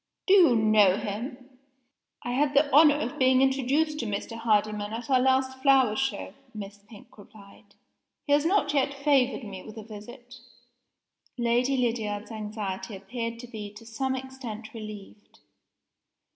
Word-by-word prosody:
"Do 380 - +4
you 345 -11 +6
know 215 -3 +4
him?" 250 +5 -7 0.6
"I 245 - -3
had 285 +3 +1
the 285 +1 +3
honor 300 -1 +7
of 250 -4 -4
being 260 0 +4
introduced 275 +4 +1
to 235 - -3
Mr. 210 +2 -4
Hardyman 215 -2 0
at 240 +4 -5
our 260 - +5
last 260 0 +1
flower 265 -6 +4
show," 270 +3 -2 0.2
Miss 205 -1 -8
Pink 205 +1 -16
replied. 200 -1 -17 0.5
"He 285 - +1
has 290 0 +4
not 325 -4 +1
yet 280 0 +1
favored 275 -2 +1
me 195 -3 -8
with 215 +3 -12
a 220 - -7
visit." 240 +4 -12 1.0
Lady 245 +3 +1
Lydiard's 225 -4 -2
anxiety 210 -1 -5
appeared 230 +3 -5
to 245 - -10
be 215 -4 -8
to 225 +2 -12
some 260 +4 -2
extent 255 -4 -8
relieved. 215 -2 -10
240 Hz, 150 wpm, -27 LUFS, 215-265 Hz, 1.0 s, honor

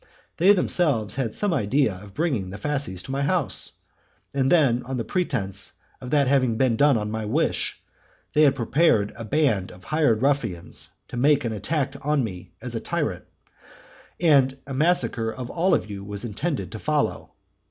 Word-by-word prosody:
They 185 +4 +6
themselves 150 - +2
had 120 -4 -2
some 205 -4 +2
idea 125 -2 +2
of 95 +1 -12
bringing 130 - -1
the 100 - -7
fasces 135 -6 -3
to 135 - -7
my 135 +1 -1
house; 155 -1 0 0.6
and 135 -1 +1
then, 135 -8 +4
on 130 +1 -4
pretence 110 - -2 0.3
of 125 - -7
that 140 -1 +3
having 130 -4 +2
been 130 -2 +2
done 145 +3 +4
by 110 - 0
my 110 +1 -3
wish, 105 - 0 0.5
they 150 - +4
had 140 -3 +5
prepared 120 -4 +2
a 115 - -7
band 110 -6 +1
of 90 +2 -15
hired 145 -7 +1
ruffians 115 -12 -1 0.2
to - - -6
make 145 +1 +3
an 115 - -1
attack 135 - -1
on 150 -1 +1
me 90 -5 -7
as - - -6
on - - -2
a - - -18
tyrant, - - -2 0.9
and 140 -5 +4
a 135 - -6
massacre 135 -6 +1
of 125 +1 -7
all 180 +2 +2
of - - -2
you 100 -2 -7
was 100 +2 -5
intended 130 - -3
to 110 - -6
follow. 150 +2 -1
130 Hz, 180 wpm, -24 LUFS, 110-150 Hz, 0.9 s, They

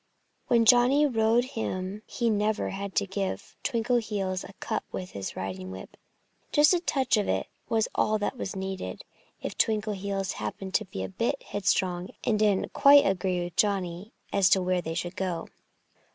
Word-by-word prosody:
When 235 -2 +4
Johnnie 250 +6 +6
rode 230 -2 +3
him 205 -6 -4
he 235 -2 0
never 210 +1 0
had 195 0 -5
to 200 - +2
give 195 0 -4
Twinkleheels 220 -6 0
a 200 - -11
cut - - -3
with 185 -1 -5
his 100 -1 -5
riding 95 -1 -5
whip. 95 0 -9 0.6
Just 295 +4 +6
a 355 - +3
touch 270 -8 +1
of 205 - 0
it - - -1 0.2
was 225 -1 +2
all 215 - +2
that 205 +5 -2
was 200 -6 -5
needed 190 - -5 0.4
if - - -4
Twinkleheels 200 -3 0
happened 190 -1 -5
to 215 - +2
be 185 - -5
a - - -3
bit 230 +8 -2
headstrong 185 -2 0
and 215 -3 +1
didn't 205 -3 +2
quite 285 0 +7
agree 185 -2 0
with 175 -1 -7
Johnnie 195 -1 0 0.2
as 195 -1 +4
to 195 - +5
where 180 0 +1
they 165 -1 -4
should 175 +2 -3
go. 180 -3 -3
200 Hz, 170 wpm, -28 LUFS, 185-225 Hz, 0.6 s, quite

